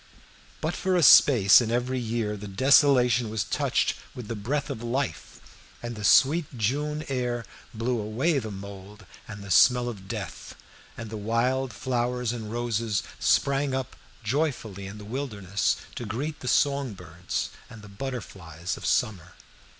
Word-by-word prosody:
But 160 Hz, +2 st, -1 dB
for 185 Hz, +1 st, 0 dB
a 175 Hz, -, +3 dB
space 120 Hz, -6 st, +8 dB
in 115 Hz, -, -2 dB
every 125 Hz, +2 st, -1 dB
year 115 Hz, -2 st, -2 dB
the 105 Hz, 0 st, -8 dB
desolation 125 Hz, +1 st, +4 dB
was 110 Hz, -2 st, -1 dB
touched -, -, 0 dB, 0.2 s
with 120 Hz, -4 st, -8 dB
the 115 Hz, -, -3 dB
breath 135 Hz, +8 st, -2 dB
of 110 Hz, -, -6 dB
life, 125 Hz, +3 st, -3 dB, 0.4 s
and 120 Hz, 0 st, -5 dB
the 105 Hz, -, -7 dB
sweet 140 Hz, +5 st, +4 dB
June 150 Hz, +7 st, -1 dB
air 125 Hz, -3 st, -2 dB, 0.3 s
blew 120 Hz, +1 st, -2 dB
away 130 Hz, +9 st, 0 dB
the 110 Hz, -3 st, -6 dB
mould 100 Hz, +1 st, -10 dB, 0.2 s
and 105 Hz, -1 st, -8 dB
the 100 Hz, -, -7 dB
smell 125 Hz, +3 st, +5 dB
of 100 Hz, -5 st, -7 dB
death, -, -, -6 dB, 0.4 s
and 115 Hz, -1 st, -7 dB
the 110 Hz, -, -4 dB
wild 120 Hz, +5 st, 0 dB
flowers 125 Hz, +1 st, -1 dB
and 110 Hz, -3 st, -6 dB
roses 115 Hz, -3 st, -1 dB, 0.2 s
sprang 140 Hz, -1 st, +2 dB
up 130 Hz, -1 st, -4 dB, 0.3 s
joyfully 110 Hz, -6 st, -2 dB
in 100 Hz, +2 st, -9 dB
the 105 Hz, -, -10 dB
wilderness 105 Hz, -6 st, -1 dB, 0.2 s
to 120 Hz, -, -6 dB
greet 145 Hz, +9 st, -4 dB
the 125 Hz, -, -8 dB
song 140 Hz, -3 st, +1 dB
birds 90 Hz, -1 st, -5 dB, 0.2 s
and 110 Hz, -2 st, -12 dB
the -, -, -11 dB
butterflies 100 Hz, -, -6 dB
of -, -, -8 dB
summer. 110 Hz, -9 st, 0 dB
120 Hz, 160 wpm, -26 LUFS, 105-130 Hz, 0.4 s, space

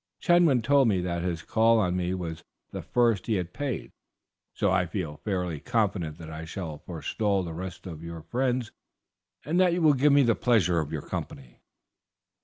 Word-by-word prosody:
Chetwynd 165 Hz, -7 st, +4 dB
told 140 Hz, +1 st, +4 dB
me 100 Hz, -4 st, +2 dB
that 85 Hz, -1 st, -2 dB
his 85 Hz, -2 st, -3 dB
call 115 Hz, +3 st, +3 dB
on 90 Hz, -5 st, +1 dB
me 90 Hz, 0 st, -1 dB
was 85 Hz, -3 st, -5 dB, 0.3 s
the -, -, -5 dB
first 115 Hz, -6 st, +1 dB
he 110 Hz, -, +1 dB
had 90 Hz, -2 st, -3 dB
paid, 145 Hz, -4 st, -4 dB, 0.6 s
so 100 Hz, -, 0 dB
I 90 Hz, -1 st, +2 dB
feel 80 Hz, -4 st, -4 dB
fairly 90 Hz, -6 st, -3 dB
confident 95 Hz, -, -1 dB
that 80 Hz, -2 st, -9 dB
I 80 Hz, +1 st, -6 dB
shall 80 Hz, -2 st, -6 dB
forestall 95 Hz, +4 st, -1 dB
the 85 Hz, -2 st, -6 dB
rest 90 Hz, +1 st, -7 dB
of 80 Hz, -4 st, -7 dB
your 85 Hz, -1 st, -7 dB
friends, 125 Hz, +4 st, -1 dB, 0.7 s
and 165 Hz, +6 st, +1 dB
that 180 Hz, -2 st, +4 dB
you 175 Hz, -, 0 dB
will 155 Hz, -2 st, +6 dB
give 140 Hz, +2 st, +3 dB
me 140 Hz, 0 st, +6 dB
the 120 Hz, -2 st, +4 dB
pleasure 105 Hz, -8 st, +2 dB
of 75 Hz, -2 st, -3 dB
your -, -, -4 dB
company." 60 Hz, -3 st, -7 dB
95 Hz, 190 wpm, -27 LUFS, 85-120 Hz, 0.7 s, will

